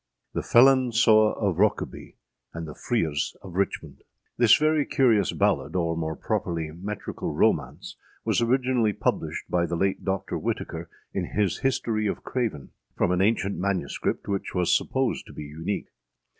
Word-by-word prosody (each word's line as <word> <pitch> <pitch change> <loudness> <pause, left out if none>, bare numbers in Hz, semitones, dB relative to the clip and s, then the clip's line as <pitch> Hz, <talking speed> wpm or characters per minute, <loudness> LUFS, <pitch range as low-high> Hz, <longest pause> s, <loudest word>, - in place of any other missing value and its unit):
THE - - -1
FELON 130 0 +5
SEWE 110 -2 +5
OF 95 -5 0
ROKEBY 105 0 0 0.4
AND 80 -1 -5
THE 75 - -7
FREERES 80 -11 -1
OF 95 - -9
RICHMOND. 95 +1 -2 0.3
[THIS 120 -3 +6
very 155 0 +2
curious 120 -7 +3
ballad, - - 0
or, 85 -2 0
more 80 -1 -3
properly, 80 +1 -2
metrical 100 +5 -5
romance, - - 0 0.3
was - - +2
originally 125 -2 +2
published - - -2
by 85 -1 +1
the 85 - -2
late 95 +2 0
Doctor 95 0 -2
Whitaker - - -4 0.2
in - - -1
his 100 -4 +1
History 115 -5 0
of - - -3
Craven, 110 - -3 0.3
from 90 - +2
an 90 0 +2
ancient 100 -3 +1
MS., 95 -6 -2 0.3
which 100 -1 -3
was 90 -1 +3
supposed 130 -2 -1
to - - -12
be - - -7
unique. 80 +7 -4
100 Hz, 155 wpm, -26 LUFS, 85-115 Hz, 0.4 s, THIS